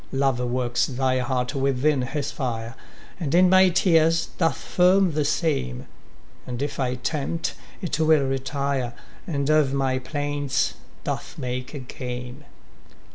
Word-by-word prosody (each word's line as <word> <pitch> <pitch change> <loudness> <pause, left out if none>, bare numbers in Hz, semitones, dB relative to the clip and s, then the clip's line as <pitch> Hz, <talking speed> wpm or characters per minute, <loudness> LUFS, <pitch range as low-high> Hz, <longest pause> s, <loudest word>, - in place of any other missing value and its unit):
Love 135 -2 +1
works 125 -1 0
thy 130 -1 0
heart 125 0 -1
within 135 +1 +1
his 140 +3 -3
fire, 115 -4 -3 0.5
And 155 -3 0
in 180 +1 +6
my 190 0 +7
tears 165 -2 +3
doth 165 -5 +2
firm 185 +1 +3
the 150 0 0
same; 140 - -1 0.6
And 120 -1 -4
if 145 -1 -4
I 125 -1 0
tempt, 150 +5 -2 0.3
it 165 -3 -1
will 155 -2 +4
retire, 135 -1 -1 0.3
And 140 -5 -1
of 150 -3 +3
my 130 -1 +1
plaints 145 0 -1 0.3
doth - - -4
make 125 +2 -4
a - - -4
game. 125 +2 -7
140 Hz, 135 wpm, -24 LUFS, 125-155 Hz, 0.6 s, my